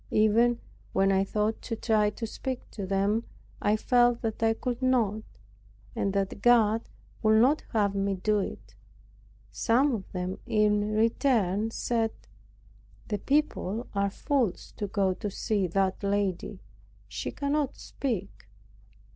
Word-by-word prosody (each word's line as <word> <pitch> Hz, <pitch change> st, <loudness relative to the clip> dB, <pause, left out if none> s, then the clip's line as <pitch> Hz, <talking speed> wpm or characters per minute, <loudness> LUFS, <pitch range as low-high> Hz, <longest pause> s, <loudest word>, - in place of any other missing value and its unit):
Even 230 Hz, +3 st, +3 dB, 0.3 s
when 195 Hz, 0 st, +3 dB
I 190 Hz, 0 st, +3 dB
thought 210 Hz, +2 st, -1 dB
to 230 Hz, -, -4 dB
try 215 Hz, -2 st, +2 dB
to 225 Hz, +2 st, -5 dB
speak 255 Hz, +3 st, -5 dB
to 200 Hz, -3 st, -5 dB
them, 200 Hz, +4 st, +1 dB, 0.4 s
I 210 Hz, +1 st, +2 dB
felt 245 Hz, +1 st, +3 dB
that 220 Hz, -1 st, -3 dB
I 225 Hz, 0 st, +3 dB
could 245 Hz, +1 st, -3 dB
not, 235 Hz, -5 st, +2 dB, 0.7 s
and 195 Hz, -, 0 dB
that 200 Hz, 0 st, -2 dB
God 225 Hz, -2 st, +4 dB, 0.3 s
would 220 Hz, 0 st, +5 dB
not 270 Hz, +6 st, +4 dB
have 205 Hz, -3 st, +2 dB
me 195 Hz, 0 st, 0 dB
do 210 Hz, +3 st, +1 dB
it. 195 Hz, -, -6 dB, 0.8 s
Some 260 Hz, +4 st, +2 dB
of 200 Hz, -5 st, -5 dB
them 180 Hz, 0 st, -4 dB
in 210 Hz, 0 st, +2 dB
return 220 Hz, -3 st, +2 dB
said, 225 Hz, -1 st, -1 dB, 1.0 s
"The 210 Hz, -2 st, -1 dB
people 250 Hz, -6 st, 0 dB
are 200 Hz, 0 st, +1 dB
fools 245 Hz, -, -1 dB
to 205 Hz, -, -2 dB
go 195 Hz, -1 st, +1 dB
to 205 Hz, +3 st, -4 dB
see 200 Hz, -1 st, -1 dB
that 190 Hz, +2 st, 0 dB
lady. 200 Hz, -3 st, -1 dB, 0.5 s
She -, -, -4 dB
cannot 285 Hz, -1 st, -1 dB
speak." 220 Hz, -8 st, -4 dB
215 Hz, 140 wpm, -28 LUFS, 200-235 Hz, 1.0 s, would